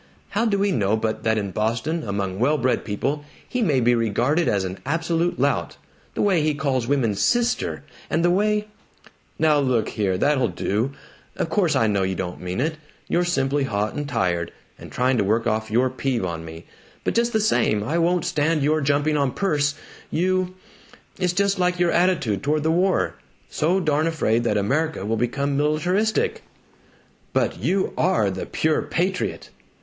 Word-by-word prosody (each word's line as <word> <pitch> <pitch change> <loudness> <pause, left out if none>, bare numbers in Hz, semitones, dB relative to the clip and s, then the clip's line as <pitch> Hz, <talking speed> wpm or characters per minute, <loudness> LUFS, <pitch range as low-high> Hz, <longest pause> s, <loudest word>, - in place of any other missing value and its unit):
How 220 +4 0
do 200 -2 +1
we 200 0 +1
know 110 - +1
but 110 0 -2
that 110 0 +1
in 100 -2 -2
Boston, 115 - -1
among 100 -4 -3
well 145 +6 +3
bred 130 -2 0
people, 140 +8 -2 0.2
he 250 - -2
may 150 - +2
be 120 0 +3
regarded 120 +8 +1
as 100 -2 +1
an 95 0 -5
absolute 165 +4 -1
lout? - - 0 0.4
The - - 0
way 190 -5 +3
he 150 -1 +1
calls 135 -5 -1
women 130 -7 +1
'Sister,' 240 - 0 0.3
and 165 +2 +1
the 175 - +4
way 210 +2 +1 0.4
" - - -19 0.3
"Now 155 -2 +3
look 130 -5 +1
here! 95 -3 -1
That'll 135 +1 +2
do! 115 +8 -1 0.4
Of - - -2
course 175 -2 +2
I 115 - +3
know 100 -2 +1
you 95 0 -1
don't 90 -1 -5
mean 90 +2 -4
it 155 +4 -1 0.3
you're 175 - +1
simply 145 -5 0
hot 105 -3 -1
and 145 -1 -4
tired, 90 -9 0 0.3
and - - -11
trying 125 0 +1
to - - +3
work 110 +4 +1
off 110 -1 -1
your 125 +4 +2
peeve 130 -5 -1
on 85 -2 -4
me. 80 +1 -10 0.4
But - - 0
just 235 +1 +2
the 220 - +2
same, 110 - +2
I 160 +10 0
won't 175 0 +1
stand 155 0 +1
your 155 +2 +2
jumping 145 +2 +1
on 140 -3 +1
Perce. 150 -7 0 0.3
You 185 +2 0 0.6
It's 180 -2 +1
just 200 +1 +1
like 180 0 +1
your 175 -1 +3
attitude 160 - +1
toward 150 +1 0
the 160 - +2
war 165 - +1 0.3
so 175 +5 +1
darn 155 -2 +1
afraid 120 -8 +1
that 105 -3 +1
America 140 +3 0
will 110 +2 0
become 140 +5 -1
militaristic 175 +9 +1 0.5
" - - -34
"But - - 0
you 185 - 0
are 160 - +2
the 95 - -5
pure 155 0 +1
patriot!" 185 +2 -2
145 Hz, 185 wpm, -23 LUFS, 110-170 Hz, 0.6 s, the